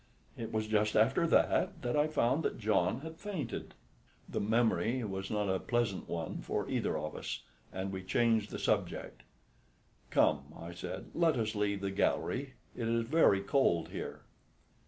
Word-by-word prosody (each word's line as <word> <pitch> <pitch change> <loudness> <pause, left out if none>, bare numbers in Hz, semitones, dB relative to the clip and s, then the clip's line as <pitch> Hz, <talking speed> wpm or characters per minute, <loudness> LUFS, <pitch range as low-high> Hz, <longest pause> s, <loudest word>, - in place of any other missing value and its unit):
It 115 - -5
was 110 0 0
just 105 0 +1
after 130 +10 +4
that - - +3
I 150 +5 +2
found 150 -1 +2
that - - -1
John 105 0 +1
had 160 +1 -8
fainted." 180 - -5 0.5
The - - -2
memory 115 +3 +2
was 95 -2 -4
not 105 -1 0
a 95 -1 +1
pleasant 120 -6 -1
one 85 -1 -3
for - - -2
either - - 0
of - - -4
us - - -5 0.3
and 95 +1 -3
we 95 -1 -4
changed 110 +2 +2
the - - -5
subject. - - -1 0.9
"Come," 70 +2 +2
I 85 +1 -7
said, 85 - -6
"let 165 -2 +3
us 110 -2 0
leave 100 -2 0
the 100 0 -1
gallery, 130 +6 0 0.2
it 115 - -2
is 115 0 +2
very 115 -7 +4
cold 100 - +2
here." - - -6
110 Hz, 160 wpm, -33 LUFS, 95-125 Hz, 0.9 s, after